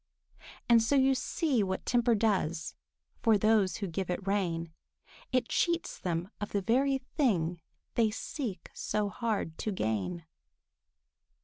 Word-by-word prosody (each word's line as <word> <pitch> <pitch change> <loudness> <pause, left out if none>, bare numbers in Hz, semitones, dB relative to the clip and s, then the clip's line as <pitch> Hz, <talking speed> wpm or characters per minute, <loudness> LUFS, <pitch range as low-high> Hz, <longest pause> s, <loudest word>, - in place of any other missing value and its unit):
And 235 -1 +6
so 225 +6 +2
you 270 0 +5
see 270 -1 0
what 190 -1 -2
temper 240 -1 +3
does 185 -7 0 0.5
For 225 -3 +5
those 215 -2 +3
who 205 -3 -3
give 180 +2 -3
it 180 +2 -2
rein; 170 -5 -1 0.6
It 255 -2 +2
cheats 340 -1 0
them 175 +2 -2
of 205 - -4
the 200 - +1
very 270 +6 +3
thing 190 - 0 0.3
They 225 -2 +3
seek 225 -1 -5
so 210 -1 -1
hard 210 -7 -2
to 215 - -1
gain. 155 - -2
210 Hz, 135 wpm, -31 LUFS, 180-240 Hz, 0.6 s, And